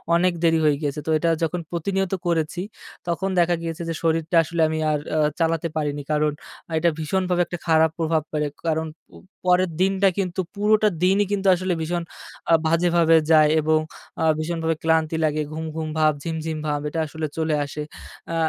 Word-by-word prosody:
অনেক 180 +1 +3
দেরি 165 -1 +4
হয়ে 150 -1 +4
গিয়েছে, 145 0 -2
তো - - -1
এটা 165 +2 0
যখন 170 +2 -1
প্রতিনিয়ত 190 +2 -1
করেছি, 170 +1 0 0.5
তখন 175 +3 -1
দেখা 175 0 +3
গিয়েছে 165 0 -5
যে, - - -1
শরীরটা 165 +1 0
আসলে 165 +1 -2
আমি 160 0 -2
আর 150 - 0 0.2
আ - - +2 0.2
চালাতে 165 0 +1
পারিনি, 145 -1 -2
কারণ 150 0 +2 0.5
এইটা 170 +2 +3
ভীষণভাবে 180 +2 0
একটা 175 - -6
খারাপ 160 0 +4
প্রভাব 160 -1 +1
পড়ে। 150 -1 -1 0.2
কারণ 160 0 0 0.3
উ - - -12 0.3
পরের 180 0 +3
দিনটা 195 +1 +3
কিন্তু 185 -1 -1
পুরোটা 215 +1 +3 0.2
দিনই 195 +3 +3
কিন্তু 200 -1 0
আসলে 185 +1 -1
ভীষণ 170 +2 -2 0.5
আ - - +6
বাজেভাবে 165 0 +4
যায় 155 -1 +6
এবং 155 +1 +2 0.4
আ - - +2 0.2
ভীষণভাবে 165 0 -1
ক্লান্তি 160 0 +2
লাগে 155 0 0
ঘুম, 160 +1 -4
ঘুম 160 -1 -3
ভাব 155 0 +4
ঝিম, 165 -1 -3
ঝিম 160 -1 -3
ভাব, 145 -1 0
এটা 165 - -3
আসলে 155 +1 -4
চলে 160 -1 +1
আসে। 150 +2 -6 0.5
আ - - -1
165 Hz, 180 wpm, -23 LUFS, 155-175 Hz, 0.5 s, আ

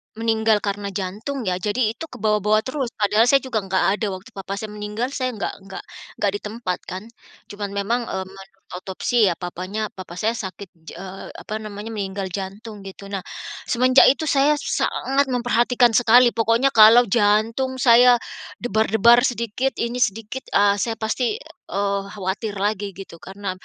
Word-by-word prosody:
meninggal 220 -2 +1
karena 200 0 -3
jantung 210 +8 -4
ya 185 -2 -1
jadi 215 +3 0
itu 325 +8 -8
kebawa-bawa 215 -3 +1
terus 260 -1 -3
padahal 215 +3 +3
saya 275 +2 +4
juga 245 -4 -1
enggak 190 -1 -1 0.2
ada, 225 - -1
waktu 185 - -12
papa 195 0 -6
saya 215 0 -6
meninggal 210 +4 -4
saya 255 -3 -2
enggak 205 - -3
enggak 195 0 -9 0.3
enggak 200 -2 0
di - - -3
tempat 210 -4 -4
kan, 185 +3 -6 0.5
cuman 205 0 -5
memang, 215 +5 0
eee, 190 - -3
mengotopsi 195 +3 -2
ya, 175 - 0
papanya 185 +5 -5
papa 185 -2 -10
saya 220 +5 0
sakit, 200 -3 -7 0.2
ja - - -8
eee, 190 0 -8
apa 215 +1 -6
namanya, 215 +1 -7
meninggal 195 -3 -4
jantung 205 +3 -7
gitu. 195 +1 -10
Nah 195 - -2 0.5
semenjak 255 +2 +5
itu 280 - +3
saya 290 0 +3
sangat 275 0 0
memperhatikan 245 -1 +2
sekali 240 +2 +5
pokoknya 230 +4 +2
kalau 225 +2 +8
jantung 225 +5 +2
saya 245 -1 +6 0.5
debar-debar 220 0 +4
sedikit 240 +2 -2
ini 240 +1 -3
sedikit, 225 +3 -2
ah, 200 0 +4
saya 225 +2 -1
pasti, 225 - -1 0.4
eee, 200 0 0
khawatir 200 +2 -3
lagi 200 -1 -2
gitu 185 -3 -11
karena, 195 +1 -6
215 Hz, 160 wpm, -22 LUFS, 200-240 Hz, 0.5 s, kalau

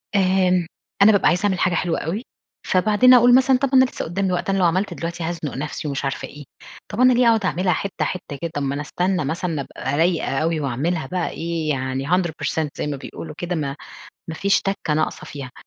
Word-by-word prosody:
آمم 185 -2 +2 0.3
أنا 215 - +8
بابقى 200 -3 +3
عايزة 180 +3 +2
أعمل 190 -2 +1
حاجة 180 - +2
حلوة 175 -1 0
أوي، 175 +8 -3 0.5
فبعدين 215 +6 +5
أقول 245 0 +7
مثلًا 260 0 +4
طب 275 +1 0
أنا 260 0 +7
لسه 255 - -5
قدّامي 190 +2 -1
وقت، 180 - -2
أنا 195 - +1
لو 185 - +3
عملت 185 +4 +1
دلوقتي 170 0 -5
هازنق 165 -3 -4
نفسي 150 +2 -4
ومش 140 0 -3
عارفة 135 - -3
إيه، 145 0 -11 0.5
طب 210 - -5
أنا 255 0 +6
ليه 245 0 +3
أقعد 225 -4 +3
أعملها 180 0 +1
حتة 200 +3 -2
حتة 175 -5 -5
كده، 170 -1 -3
طب 145 - -2
ما 140 0 -1
أنا 145 - -3
أستنى 180 +3 -1
مثلًا 160 0 -2
أبقى 135 +1 -4
رايقة 165 -4 +1
أوي 160 0 0
وأعملها 145 +4 -2
بقى 180 +4 -2
إيه 165 -1 -3
يعني 130 -1 -2
100% 165 -3 0
زي - - -2
ما 145 - -3
بيقولوا 155 +3 -9
كده، 175 0 -3
ما 140 -3 -3 0.5
ما 160 - -4
فيش 200 +4 +2
تَكة 195 -6 -2
ناقصة 155 +1 -1
فيها، 135 -3 -8
170 Hz, 215 wpm, -21 LUFS, 150-195 Hz, 0.5 s, أنا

